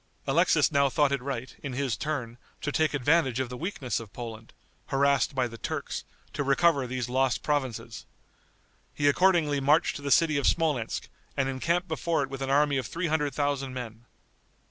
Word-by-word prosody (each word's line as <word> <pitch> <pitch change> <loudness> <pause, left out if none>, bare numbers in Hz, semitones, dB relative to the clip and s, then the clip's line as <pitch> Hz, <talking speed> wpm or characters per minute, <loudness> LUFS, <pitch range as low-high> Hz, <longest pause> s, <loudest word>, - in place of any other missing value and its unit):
Alexis - - +3
now 140 0 +3
thought 145 0 +2
it 140 -2 0
right, 130 -2 -5
in 140 -3 -5
his 130 -2 -1
turn, 125 -6 -4 0.2
to 150 - -3
take 155 0 +1
advantage 135 -2 +2
of 130 -2 -1
the 125 - -6
weakness 145 -4 -3
of 110 -3 -10
Poland, 115 -1 -8 0.4
harassed 140 +1 +2
by 130 -2 +1
the 115 -1 -11
Turks, - - -4 0.3
to - - -2
recover 140 0 +3
these 125 -1 -3
lost 130 0 +1
provinces. 135 -6 -2 0.9
He 145 - +1
accordingly 155 -2 +3
marched 145 +4 +3
to - - -10
the 140 - -3
city 155 0 +4
of 140 - +1
Smolensk, 150 -9 0 0.3
and 135 - +1
encamped 170 +7 0
before 160 -2 0
it 135 - -6
with 135 0 -6
an 135 - -2
army 145 0 +3
of 130 -4 -2
three 170 - -2
hundred 150 -3 0
thousand 140 -3 -1
men. 120 -2 -7
140 Hz, 185 wpm, -28 LUFS, 130-150 Hz, 0.9 s, city